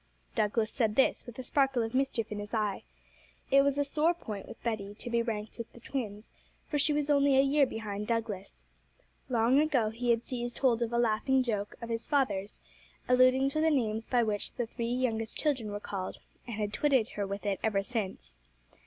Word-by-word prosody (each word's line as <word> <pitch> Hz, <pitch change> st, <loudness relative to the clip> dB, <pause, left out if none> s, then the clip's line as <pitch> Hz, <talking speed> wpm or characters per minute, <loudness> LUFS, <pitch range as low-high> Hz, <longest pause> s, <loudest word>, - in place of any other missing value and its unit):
Douglas 215 Hz, +1 st, +1 dB
said 220 Hz, -3 st, +1 dB
this 265 Hz, -, +2 dB
with 240 Hz, -, -9 dB
a 255 Hz, -, -5 dB
sparkle 270 Hz, -2 st, +2 dB
of 225 Hz, +1 st, -4 dB
mischief 255 Hz, -5 st, 0 dB
in 210 Hz, -, -3 dB
his 205 Hz, +2 st, -4 dB
eye. 210 Hz, -3 st, 0 dB, 0.7 s
It 275 Hz, +1 st, +7 dB
was 280 Hz, 0 st, +1 dB
a 285 Hz, -, +3 dB
sore 305 Hz, +4 st, +2 dB
point 215 Hz, -11 st, -7 dB
with -, -, -11 dB
Betty 210 Hz, -3 st, -3 dB
to 240 Hz, -, -7 dB
be 235 Hz, 0 st, +3 dB
ranked 220 Hz, -1 st, -4 dB
with 235 Hz, -, -6 dB
the -, -, -13 dB
twins, 220 Hz, -4 st, -5 dB, 0.4 s
for 295 Hz, -, -1 dB
she 290 Hz, -, +2 dB
was 295 Hz, 0 st, +1 dB
only 280 Hz, -1 st, +4 dB
a -, -, +8 dB
year 280 Hz, 0 st, +4 dB
behind 210 Hz, -3 st, -5 dB
Douglas. 220 Hz, -4 st, -3 dB, 0.6 s
Long 240 Hz, +2 st, +4 dB
ago 270 Hz, -8 st, +2 dB
he 240 Hz, +2 st, -3 dB
had 235 Hz, 0 st, +2 dB
seized 240 Hz, -1 st, -4 dB
hold 245 Hz, -3 st, +2 dB
of 235 Hz, -1 st, 0 dB
a 235 Hz, -, 0 dB
laughing 240 Hz, +3 st, +2 dB
joke 210 Hz, -4 st, -2 dB
of 235 Hz, -, -5 dB
his 230 Hz, 0 st, -3 dB
father's, 210 Hz, -9 st, 0 dB, 0.5 s
alluding 255 Hz, +2 st, +5 dB
to 310 Hz, +3 st, -1 dB
the 320 Hz, -, +4 dB
names 225 Hz, -6 st, 0 dB
by 245 Hz, -2 st, +3 dB
which 210 Hz, -2 st, -2 dB
the 240 Hz, -, -2 dB
three 230 Hz, +1 st, -4 dB
youngest 230 Hz, -3 st, -1 dB
children 260 Hz, -9 st, 0 dB
were 205 Hz, -, -3 dB
called, 195 Hz, -2 st, -5 dB, 0.3 s
and 235 Hz, -, -4 dB
had 210 Hz, -1 st, -2 dB
twitted 260 Hz, 0 st, +2 dB
her 200 Hz, -1 st, -3 dB
with 200 Hz, +1 st, -5 dB
it 200 Hz, -2 st, 0 dB
ever 205 Hz, -3 st, +1 dB
since. 200 Hz, -, -4 dB
235 Hz, 205 wpm, -30 LUFS, 215-265 Hz, 0.7 s, a